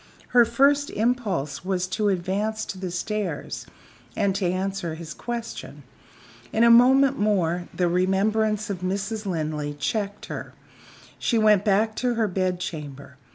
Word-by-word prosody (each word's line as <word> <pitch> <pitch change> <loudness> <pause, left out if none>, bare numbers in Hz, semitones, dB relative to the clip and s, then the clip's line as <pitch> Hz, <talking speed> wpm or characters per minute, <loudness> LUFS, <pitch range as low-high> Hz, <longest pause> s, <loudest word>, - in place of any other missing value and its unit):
Her 245 -1 +6
first 280 +5 +3
impulse 205 - -1
was 185 -1 -1
to 210 +3 0
advance 200 +4 -1
to 190 - -7
the 185 -1 -4
stairs 180 -2 -3 0.5
and 200 -1 +1
to 195 -1 0
answer 185 -2 -2
his 160 -1 -8
question. 235 +3 -6 0.7
In 225 - +2
a 235 - +7
moment 265 +3 +6
more 180 -4 +1
the 180 - 0
remembrance 205 +4 +1
of 190 - -4
Mrs. 200 +4 -3
Linley 155 -4 -2
checked 205 +6 -3
her. - - -7 0.6
She 235 - +1
went 215 -3 +4
back 215 +1 +2
to 250 -1 0
her 225 -1 +1
bed 185 -1 -1
chamber. 145 -7 -7
195 Hz, 145 wpm, -25 LUFS, 180-220 Hz, 0.7 s, a